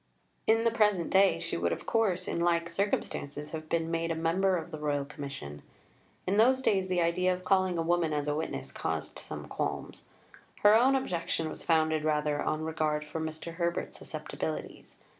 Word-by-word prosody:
In 225 +1 +4
the 230 - +3
present 210 -6 +2
day 195 0 +5
she - - -3
would 85 0 0
of - - -4
course, 190 -6 +1
in - - -1
like 170 0 +1
circumstances, 150 -6 -2
have 155 -1 -6
been 165 -1 0
made 165 0 0
a 165 - 0
member 180 +4 +2
of 165 +1 -6
the 155 - -6
Royal 145 -2 0
Commission. 140 - -7 0.6
In 195 +2 +1
those 260 +4 +4
days 190 -5 +2
the 180 -1 +1
idea 180 +2 +2
of 180 0 -3
calling 185 -2 +2
a 165 - +1
woman 170 -1 +1
as 150 -1 -1
a 145 - +1
witness 65 - -3
caused - - -3
some - - -6
qualms. - - -4 0.6
Her 205 0 +8
own 255 +5 +5
objection 170 -9 -1
was - - -5
founded 160 -1 +2
rather 150 -1 +1
on 155 +1 -1
regard 155 -1 -1
for 150 +2 -5
Mr. 160 +1 -5
Herbert's 170 -1 -2
susceptibilities. - - -5
165 Hz, 185 wpm, -30 LUFS, 155-185 Hz, 0.6 s, Her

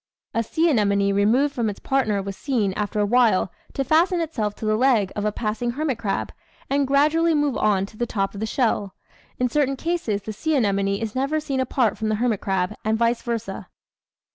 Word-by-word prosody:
A 230 - +1
sea 320 +9 +1
anemone 200 -4 +2
removed 235 +9 +2
from 230 -3 0
its 205 - -6
partner 220 -7 0
was 195 0 -5
seen, 225 -8 -1
after 210 +1 -2
a 205 - +3
while, 220 -5 +3 0.2
to 275 - -1
fasten 340 +6 +3
itself 235 -11 -2
to - - -7
the 215 0 +2
leg 225 -5 +3
of 205 - -2
a 210 - +1
passing 225 +3 -2
hermit 280 -4 -2
crab 205 -4 -2 0.4
and 280 0 +2
gradually 305 +4 +3
move 290 -3 +1
on 195 -2 +2
to 215 - -15
the 240 - -1
top 195 -3 -1
of 200 - -7
the 220 - -2
shell. 220 -5 0 0.4
In 250 - +1
certain 275 +1 +1
cases 265 - -2
the 215 - -5
sea 315 +9 -1
anemone 200 -5 +1
is 225 -2 -4
never 275 +4 0
seen 275 -3 -3
apart 255 -3 +1
from 220 -1 -1
the 215 - +1
hermit 225 -2 0
crab, 190 0 -1
and 220 +1 +1
vice 235 +1 +1
versa. 230 -2 -4
230 Hz, 210 wpm, -23 LUFS, 205-275 Hz, 0.4 s, a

